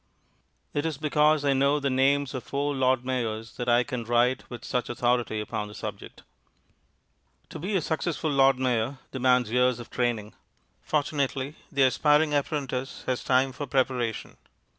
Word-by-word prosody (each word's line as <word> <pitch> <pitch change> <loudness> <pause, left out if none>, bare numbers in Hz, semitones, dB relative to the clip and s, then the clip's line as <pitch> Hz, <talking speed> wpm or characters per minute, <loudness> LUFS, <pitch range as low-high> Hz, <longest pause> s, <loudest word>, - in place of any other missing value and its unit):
It 145 - 0
is 160 -3 -2
because 150 0 +2
I 140 - +4
know 140 +2 +2
the 140 -1 -1
names 140 +1 +2
of 130 - -4
four 145 +1 -2
Lord 130 -2 +1
Mayors 115 -3 -3
that 120 0 -2
I 120 +1 +4
can 125 -2 -4
write 120 +2 +1
with 120 -1 -8
such 125 -1 -2
authority 120 -2 0
upon 105 0 -4
the 105 - -11
subject. - - -8 1.3
To - - -8
be 195 +6 -2
a 185 - +2
successful 160 0 -2
Lord 135 -1 +4
Mayor 130 0 0
demands 125 -3 +2
years 125 0 +3
of 120 - -10
training. 115 -4 -1 0.5
Fortunately, 140 -2 -1 0.2
the 140 -1 +3
aspiring 150 +3 +3
apprentice 140 -2 -2
has 130 -1 -1
time 130 +1 +2
for 140 +2 -6
preparation. 125 -4 -1
130 Hz, 160 wpm, -27 LUFS, 120-145 Hz, 1.3 s, I